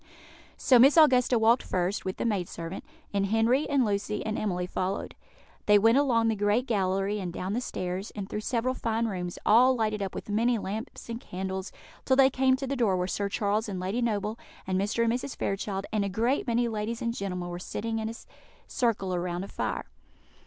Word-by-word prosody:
So 255 -2 +5
Miss 275 +6 +7
Augusta 255 -5 +5
walked 230 +2 +4
first, 185 +2 -2
with 185 - -3
the - - -2
maid 200 -6 -1
servant, 165 +3 -6 0.3
and 200 -1 +1
Henry, 225 +7 +2
and 275 -3 +3
Lucy, 205 0 -2
and 215 - -2
Emily 180 -5 -1
followed. 185 +2 -3 0.5
They 210 0 +7
went 225 +6 +5
along 235 -5 +2
the 225 - +1
great 205 +4 +1
gallery, 195 -2 0
and 180 -3 -4
down 185 +3 -4
the 240 - -1
stairs, 185 -3 -4
and 200 -2 -5
through 210 - -4
several 245 +2 0
fine 230 -2 -1
rooms, 180 -4 -4
all 250 +4 +6
lighted 215 -3 -1
up 195 -2 -4
with - - -6
many 230 +3 +2
lamps 215 +5 -6
and 230 0 -5
candles, 190 -2 -5 0.3
till 260 - +3
they 270 0 +6
came 260 0 +3
to 270 +1 -4
the 275 +1 -2
door 220 -7 +2
where 180 - 0
Sir 200 +2 -2
Charles 210 +2 0
and 190 -2 -4
Lady 190 +7 -2
Noble, 215 -1 -1 0.3
and 185 0 0
Mr. 210 +3 0
and 230 0 +2
Mrs. 255 +2 -4
Fairchild, 195 0 -2
and 210 -2 +1
a 200 - -1
great 235 +8 0
many 240 0 +2
ladies 225 +1 -3
and 230 0 -1
gentlemen 180 -5 -4
were 175 0 -5
sitting 225 +4 -3
in 220 0 -2
a 225 - -6 0.5
circle 205 -7 0
round 175 +1 -3
a - - -10
fire. - - -3
215 Hz, 210 wpm, -28 LUFS, 195-235 Hz, 0.5 s, Miss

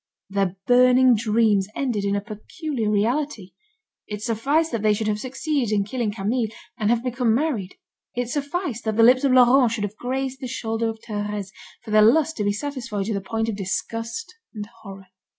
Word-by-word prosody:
Their 195 -2 0
burning 250 +1 +6
dreams 215 -2 +2
ended 235 -7 -1
in 200 0 +1
a 200 - -1
peculiar 225 - -4
reality: 220 0 -1 0.6
it 210 0 -6
sufficed 280 +9 +1
that 230 -3 -2
they 210 -1 +3
should 220 +1 -3
have 210 0 0
succeeded 265 -1 -2
in 205 -2 +2
killing 225 +1 -2
Camille, 220 +3 -1 0.3
and 210 -1 -1
have 235 0 +2
become 245 -2 +1
married, 240 -10 -1 0.4
it 245 0 -1
sufficed 285 - -3
that 220 -1 0
the 225 - +6
lips 255 +3 +6
of 275 - +3
Laurent 250 -1 +6
should 220 -3 -2
have 205 0 -4
grazed 265 +1 -3
the 255 - -4
shoulder 225 -2 -2
of 220 0 -6
Thérèse, 205 -2 -4 0.3
for 220 - -8
their 215 0 +6
lust 310 +9 +4
to 210 - -1
be 205 - +2
satisfied 235 -4 -4
to 220 - -2
the 200 - -2
point 225 +3 -2
of 225 - -2
disgust 230 - -4 0.2
and 210 -1 -5
horror. 195 -2 -10
225 Hz, 190 wpm, -23 LUFS, 210-255 Hz, 0.6 s, burning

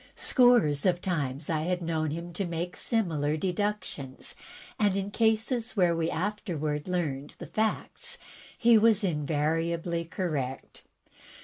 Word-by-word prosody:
Scores 240 - +4
of 175 -1 +2
times 150 -6 -2
I 160 -2 0
had 180 +2 -1
known 160 -2 0
him 170 +3 -5
to 195 - -2
make 170 +1 -3
similar 160 -9 0
deductions, 185 -7 -3 0.5
and 205 -2 +3
in 195 +1 -2
cases 225 +2 +1
where 175 -3 +4
we 165 0 0
afterward 160 -6 -2
learned 150 -6 -2
the - - -7
facts, 220 0 -1 0.4
he 230 -1 +6
was 220 -1 +4
invariably 165 +1 0
correct. 150 -8 -4
170 Hz, 125 wpm, -29 LUFS, 155-205 Hz, 0.5 s, he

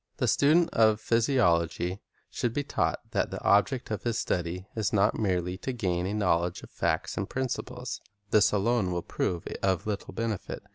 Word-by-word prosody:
The - - 0
student 160 +4 +4
of 110 -1 +4
physiology 95 - +1 0.3
should 120 -2 -1
be 145 - 0
taught - - -1
that - - 0
the - - -5
object 105 +5 +2
of 105 - -2
his 115 -2 -1
study 90 -3 -2
is 110 -4 0
not 100 -2 +2
merely 90 -3 0
to 130 - -3
gain 90 -7 -1
a 100 - -2
knowl 90 -5 +2
edge 90 - -6
of - - -12
facts - - -1
and 95 - -2
principles. 125 -1 -4 0.3
This 105 -1 +5
alone 105 -1 +1
will 85 -1 -2
prove 85 -2 -2 0.2
of 95 -3 +1
little 105 -2 -3
benefit. 115 -3 -3
105 Hz, 180 wpm, -28 LUFS, 90-120 Hz, 0.3 s, This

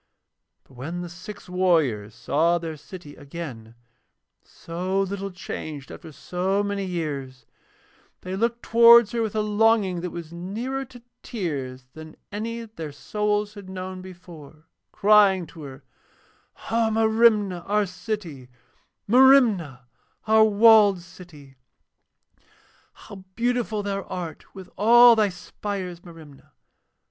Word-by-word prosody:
But - - -23
when 155 +8 -6
the 175 - -7
six 185 +4 -11
warriors 160 - 0
saw 165 +7 +1
their 165 -2 -6
city 150 -1 -12
again, 140 -7 -9 0.7
so 185 +3 -4
little 195 0 -4
changed 155 -5 -8
after 160 - -11
so 185 +6 -2
many 200 -1 -3
years, 140 -8 -5 0.8
they 185 +1 -5
looked 235 +3 -1
towards 235 -1 +7
her 235 - -1
with 220 -1 -3
a 215 - +1
longing 210 -4 +2
that 180 - -4
was 170 -1 -9
nearer 230 +10 -4
to 245 -2 -16 0.2
tears 135 - -5
than 155 0 -11 0.2
any 230 +3 -4
that 225 -1 -13
their 155 -2 -6
souls 210 +6 -2
had 200 -3 -11
known 185 0 -7
before, 170 -4 -13 0.3
crying 200 -3 +4
to 165 - -13
her: 135 -1 -10 0.9
'O 225 0 +2
Merimna, 220 -4 +3
our 210 +1 +1
city: 180 - -6 0.6
Merimna, 225 - +4 0.4
our 220 0 +5
walled 210 -3 +5
city. 150 -7 -15 1.4
'How 195 -2 -13
beautiful 235 -3 -1
thou 200 -1 -3
art 175 -3 -8
with 190 -2 -10
all 240 +3 +7
thy 215 -2 +2
spires, 180 0 -7
Merimna. 160 -5 -15
185 Hz, 125 wpm, -24 LUFS, 165-215 Hz, 1.4 s, towards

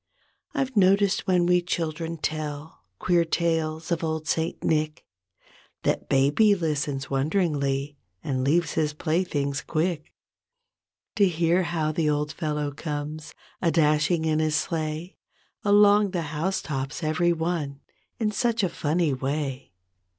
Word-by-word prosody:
I've 265 -2 -1
noticed 200 0 +3
when 180 -2 +3
we 180 0 +4
children 165 -1 -3
tell 155 -2 -5
Queer 175 - +2
tales 165 -1 -1
of 170 -1 0
old 160 -1 -2
Saint 160 0 -1
Nick 155 -1 0 0.8
That - - -1
baby 145 +11 +4
listens 145 -6 -2
wonderingly 140 -2 0 0.2
And 130 -2 -1
leaves 165 +5 +2
his 150 -2 0
playthings 150 -3 -1
quick 165 -1 -2 1.1
To 200 -2 +5
hear 170 +1 +2
how 165 -3 -1
the 155 -1 0
old 150 0 0
fellow 150 -2 -2
comes 150 +1 -5 0.3
A 170 - +3
dashing 160 +1 +2
in 155 -1 +1
his 155 -1 +1
sleigh 155 +2 -3 0.5
Along 205 0 +5
the 180 -2 -2
house 175 +6 -1
tops 135 +2 -4
every 160 +3 +2
one 160 -4 -2 0.4
In 215 -2 0
such 230 0 0
a 185 - +2
funny 160 -1 0
way. 135 -1 -3
160 Hz, 130 wpm, -25 LUFS, 150-175 Hz, 1.1 s, To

